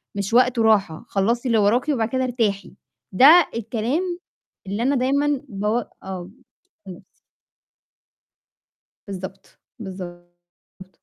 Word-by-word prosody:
مش 200 Hz, +2 st, -3 dB
وقته 250 Hz, -1 st, +4 dB
راحة، 200 Hz, -7 st, +2 dB
خلصي 230 Hz, +6 st, 0 dB
اللي 230 Hz, -2 st, +2 dB
وراكِ 240 Hz, +8 st, +2 dB
وبعد 230 Hz, -6 st, 0 dB
كده 260 Hz, 0 st, -1 dB
ارتاحي. 225 Hz, -6 st, -2 dB, 0.4 s
ده 300 Hz, -, +7 dB
الكلام 255 Hz, -, -2 dB, 0.5 s
اللي 205 Hz, +4 st, -2 dB
أنا 275 Hz, +2 st, +2 dB
دايمًا 280 Hz, +2 st, +1 dB
بو 210 Hz, +3 st, -1 dB, 0.2 s
آه، 185 Hz, -1 st, -7 dB, 0.6 s
لنفسي. 185 Hz, +1 st, -10 dB, 2.0 s
بالضبط، 190 Hz, -1 st, -9 dB, 0.2 s
بالضبط. 175 Hz, -1 st, -12 dB
220 Hz, 105 wpm, -22 LUFS, 190-255 Hz, 2.0 s, ده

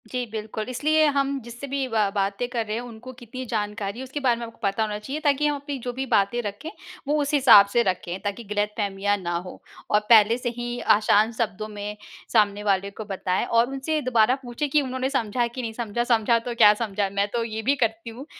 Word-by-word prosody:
जी, 250 Hz, 0 st, -2 dB
बिल्कुल, 220 Hz, -1 st, -5 dB
इसलिए 310 Hz, +5 st, +2 dB
हम 275 Hz, 0 st, 0 dB
जिससे 240 Hz, +4 st, -8 dB
भी 275 Hz, -1 st, -2 dB
ब 225 Hz, -, -6 dB, 0.2 s
बातें 200 Hz, +4 st, -1 dB
कर 235 Hz, -3 st, -2 dB
रहे 215 Hz, 0 st, -3 dB
हैं, 235 Hz, -, -3 dB
उनको 240 Hz, +1 st, -10 dB
कितनी 250 Hz, +1 st, -8 dB
जानकारी 210 Hz, -2 st, -3 dB
है -, -, -5 dB
उसके 265 Hz, +3 st, -5 dB
बारे 255 Hz, -4 st, +2 dB
में 235 Hz, -, -4 dB
आपको 230 Hz, -, -13 dB
पता 200 Hz, +2 st, +1 dB
होना 210 Hz, -1 st, -3 dB
चाहिए 270 Hz, +8 st, -5 dB
ताकि 295 Hz, -1 st, +2 dB
हम 295 Hz, -, 0 dB
अपनी 285 Hz, 0 st, -5 dB
जो 245 Hz, +1 st, -4 dB
भी 265 Hz, +2 st, -3 dB
बातें 215 Hz, +3 st, +2 dB
रखें, 205 Hz, +8 st, -6 dB, 0.4 s
वो 300 Hz, +1 st, +1 dB
उस 285 Hz, +1 st, -2 dB
हिसाब 255 Hz, -8 st, +8 dB
से 240 Hz, -, +4 dB
रखें 185 Hz, -2 st, -2 dB
ताकि 205 Hz, +3 st, -4 dB
गलतफ़हमियाँ 205 Hz, -1 st, -1 dB
ना 175 Hz, -3 st, -3 dB
हों। 180 Hz, +1 st, -8 dB, 0.3 s
और 210 Hz, -, +4 dB
पहले 225 Hz, 0 st, +6 dB
से 245 Hz, -1 st, -3 dB
ही 240 Hz, 0 st, -4 dB, 0.2 s
आसान 215 Hz, +1 st, +3 dB
शब्दों 215 Hz, -2 st, -3 dB
में 210 Hz, 0 st, -6 dB, 0.4 s
सामने 210 Hz, -2 st, +3 dB
वाले 200 Hz, -1 st, +1 dB
को 215 Hz, +2 st, -8 dB
बताएँ 190 Hz, -2 st, -1 dB
और 230 Hz, +1 st, +3 dB
उनसे 275 Hz, +3 st, -2 dB
दोबारा 250 Hz, -1 st, +3 dB
पूछें 245 Hz, +4 st, -3 dB
कि 295 Hz, +2 st, +3 dB
उन्होंने 260 Hz, -1 st, -2 dB
समझा 240 Hz, -3 st, 0 dB
कि 240 Hz, +2 st, -6 dB
नहीं 225 Hz, -2 st, -4 dB
समझा। 235 Hz, 0 st, -2 dB
समझा 235 Hz, -1 st, +2 dB
तो 240 Hz, -, -4 dB
क्या 210 Hz, -2 st, +7 dB
समझा, 210 Hz, -2 st, -2 dB
मैं 200 Hz, +1 st, 0 dB
तो 235 Hz, -1 st, 0 dB
ये 220 Hz, -1 st, -4 dB
भी 270 Hz, +6 st, +2 dB
करती 225 Hz, -2 st, -1 dB
हूँ 245 Hz, +5 st, -9 dB
230 Hz, 225 wpm, -24 LUFS, 210-255 Hz, 0.4 s, हिसाब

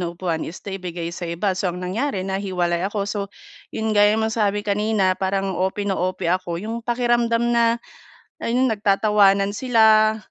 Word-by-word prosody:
na 175 Hz, -, -2 dB
upuan 170 Hz, -1 st, -3 dB
is 170 Hz, -, -11 dB
naibigay 180 Hz, -4 st, -5 dB
sa 175 Hz, -1 st, -6 dB
iba, 180 Hz, +4 st, -1 dB
so 185 Hz, 0 st, -1 dB
ang 175 Hz, -, -4 dB
nangyari 200 Hz, +1 st, -2 dB
nahiwalay 185 Hz, -3 st, -1 dB
ako. 205 Hz, -1 st, -2 dB
So 205 Hz, +1 st, -3 dB, 0.5 s
'yun, 220 Hz, 0 st, -2 dB
gaya 205 Hz, 0 st, +4 dB
nasabi 215 Hz, -2 st, 0 dB
kanina, 205 Hz, -2 st, +1 dB
parang 195 Hz, +1 st, -1 dB
OP 190 Hz, +3 st, -1 dB
na 200 Hz, -, 0 dB
OP 185 Hz, -1 st, -2 dB
ako, 175 Hz, 0 st, -1 dB
yung 225 Hz, +5 st, -5 dB
pakiramdam 240 Hz, 0 st, +1 dB
na, 235 Hz, 0 st, +3 dB, 0.6 s
ayun 250 Hz, +1 st, +1 dB
nagtatawanan 200 Hz, -1 st, +3 dB
sila 220 Hz, -2 st, +4 dB
200 Hz, 155 wpm, -22 LUFS, 185-220 Hz, 0.6 s, gaya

